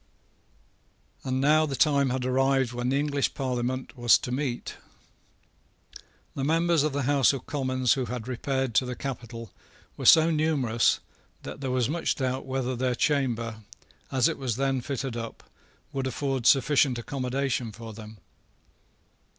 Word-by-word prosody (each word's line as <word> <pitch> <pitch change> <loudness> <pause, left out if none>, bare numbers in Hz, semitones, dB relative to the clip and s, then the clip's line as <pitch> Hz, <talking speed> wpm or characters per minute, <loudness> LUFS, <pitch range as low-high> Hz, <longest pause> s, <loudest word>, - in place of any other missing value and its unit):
And 130 0 -1
now 155 +3 +4
the 135 - -3
time 140 -2 +3
had 125 0 -2
arrived 135 -1 +2
when 120 +1 -2
the 135 - +1
English 145 -1 0
Parliament 130 0 -3
was 120 -2 +5
to 125 - -6
meet. 130 -2 -3 1.6
The 135 - -4
members 165 +2 +2
of 155 +1 +1
the 140 0 -2
House 140 +1 +3
of 130 -2 -6
Commons 130 -4 +1
who 130 -2 -2
had 120 -1 -5
repaired 130 0 -2
to 125 - +3
the 125 - -4
capital 115 -5 -6 0.5
were - - -1
so 160 0 +7
numerous 145 -8 +1 0.4
that - - -8
there 135 - -2
was 125 -2 +1
much 165 +4 -1
doubt 130 0 -2
whether 130 -1 -2
their 125 0 0
chamber, 120 -7 0 0.5
as 130 -2 +3
it - - -3
was 125 -5 -2
then 135 0 0
fitted 135 -1 -4
up, 115 -1 -6 0.5
would 135 -1 -2
afford 135 -1 -1
sufficient 135 -1 +4
accommodation 130 -1 -2
for 115 +1 -9
them. 110 0 -11
130 Hz, 150 wpm, -27 LUFS, 125-140 Hz, 1.6 s, so